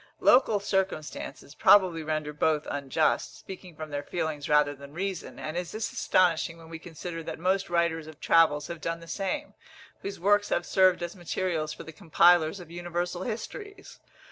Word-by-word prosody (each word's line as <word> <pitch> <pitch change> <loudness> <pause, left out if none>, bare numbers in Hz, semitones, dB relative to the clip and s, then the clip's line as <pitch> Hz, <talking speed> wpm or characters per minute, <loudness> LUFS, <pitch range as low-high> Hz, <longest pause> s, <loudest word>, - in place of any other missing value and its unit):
Local 235 -5 +5
circumstances 190 -7 -3
probably 180 -1 +5
render 155 -1 -3
both 150 0 +1
unjust, 145 +2 0
speaking 185 -3 -10
from 155 0 -7
their 145 0 -2
feelings 155 -2 -3
rather 150 -1 +4
than 140 +1 -13
reason; 190 0 -4
and 155 +1 -5
is 175 -1 -4
this 220 +1 -3
astonishing 170 -2 +2
when 165 -1 -14
we 165 -1 -7
consider 165 0 -7
that - - -6
most 190 +3 0
writers 170 -2 0
of 155 -1 -12
travels 155 -3 +4
have 170 -2 -7
done 165 0 -3
the 165 - -13
same, 205 - -3 0.5
whose 200 0 -6
works 205 +3 +3
have 175 - 0
served 185 -2 +3
as 175 +1 -5
materials 175 -3 -2
for 150 - -8
the 160 - -10
compilers 170 0 +4
of 170 -2 -12
universal 175 +1 -3
histories? 395 - -7
170 Hz, 170 wpm, -28 LUFS, 155-185 Hz, 0.5 s, Local